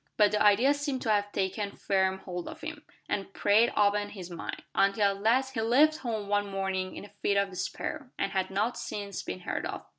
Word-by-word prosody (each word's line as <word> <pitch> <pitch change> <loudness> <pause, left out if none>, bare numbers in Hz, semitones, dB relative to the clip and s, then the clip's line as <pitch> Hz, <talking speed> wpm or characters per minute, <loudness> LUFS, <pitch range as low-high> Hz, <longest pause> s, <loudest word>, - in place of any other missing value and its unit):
But 210 -1 +5
the 210 0 +1
idea 215 +7 +5
seemed 285 -3 -3
to 220 - +1
have 205 -1 +1
taken 200 +1 -2
firm 190 -1 +1
hold 180 -2 -5
of 320 - -8
him, 305 -1 -6 0.3
and 195 -1 -2
preyed 215 +4 +4
upon 205 0 +3
his 185 -4 -9
mind, 170 - -6
until 200 0 +3
at - - -12
last 260 +5 +2
he 225 - -1
left 285 +8 +4
home 225 -8 -3
one 205 0 +1
morning 190 -1 -2
in - - -7
a - - -13
fit 200 - +2
of 200 -1 +1
despair, 255 +9 -4
and 195 - -1
had 190 -1 0
not 210 +5 0
since 200 -2 -5
been 90 - -6
heard - - -3
of. - - -6
205 Hz, 215 wpm, -29 LUFS, 195-230 Hz, 0.3 s, But